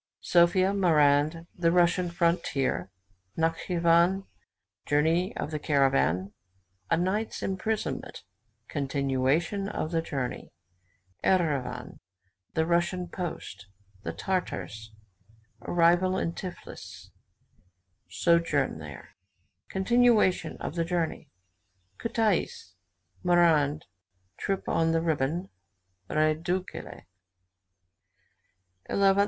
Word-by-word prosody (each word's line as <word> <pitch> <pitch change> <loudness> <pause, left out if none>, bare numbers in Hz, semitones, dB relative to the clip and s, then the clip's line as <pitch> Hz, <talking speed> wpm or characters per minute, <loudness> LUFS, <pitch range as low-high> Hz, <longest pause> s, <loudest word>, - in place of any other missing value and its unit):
SOPHIA 185 +3 +4
MARAND 155 -3 +3
THE 170 -1 +2
RUSSIAN 175 0 +3
FRONTIER 170 - 0 0.5
NATSCHIVAN 170 +3 +2 0.6
JOURNEY 160 +5 +2
OF 150 - -3
THE 155 - -2
CARAVAN 135 - +2 0.6
A - - +3
NIGHT'S 190 +6 -1
IMPRISONMENT 210 +3 -3 0.4
CONTINUATION 140 +7 0
OF 160 -6 -3
THE 165 -1 +1
JOURNEY 135 -6 -4 0.7
ERIVAN 160 -8 0 0.6
THE 160 - +2
RUSSIAN 175 +1 0
POST 110 - -6 0.3
THE - - -4
TARTARS 110 - -3 0.7
ARRIVAL 175 +5 +3
IN 170 - -1
TIFLIS 180 0 -9 1.0
SOJOURN 165 - +1
THERE 75 -4 -10 0.6
CONTINUATION 210 -4 +3
OF - - -5
THE 170 -1 0
JOURNEY 170 -1 -2 0.7
KUTAIS 215 - -1 0.5
MARAND 160 -4 +3 0.5
TRIP 195 -1 -2
ON 165 0 +2
THE 165 - +2
RIBON 160 +2 -1 0.6
REDUTKALE. 160 +4 -1
170 Hz, 80 wpm, -28 LUFS, 145-180 Hz, 1.0 s, SOPHIA